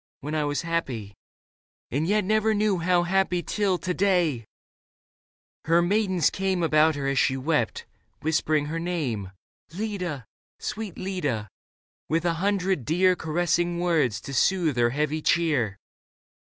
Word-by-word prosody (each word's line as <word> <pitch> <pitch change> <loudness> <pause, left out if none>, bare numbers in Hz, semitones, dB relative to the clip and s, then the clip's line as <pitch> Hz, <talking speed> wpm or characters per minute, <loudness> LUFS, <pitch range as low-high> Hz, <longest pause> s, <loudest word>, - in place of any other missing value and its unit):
When 150 +3 -5
I 155 -1 0
was 145 +2 -1
happy 130 -12 -3 0.4
— - - -77
and 150 +5 0
yet 210 +2 +2
never 215 +2 +2
knew 205 -3 +1
How 175 +1 +2
happy 180 -1 +1
till 200 -4 0
to 180 +1 -3
day! 175 - +1 0.6
" - - -45
Her 165 +1 +4
maidens 190 -2 +2
came 190 -2 -1
About 155 0 +4
her 140 -1 -3
as 140 -1 +1
she 130 +2 +2
wept, 150 +4 -1 0.4
whispering 155 -1 +1
her 160 +3 -3
name, 145 - -2 0.4
Leda, 180 - -4 0.3
sweet 215 -4 -5
Leda, 145 - -2 0.6
with 165 +2 0
a 170 - +2
hundred 195 -6 +1
dear 180 +6 +3
Caressing 175 +1 0
words 160 -11 +1
to 140 - -7
soothe 165 +1 +2
her 120 0 +3
heavy 150 +4 -1
cheer. 140 -13 +1
170 Hz, 145 wpm, -26 LUFS, 145-185 Hz, 0.6 s, Her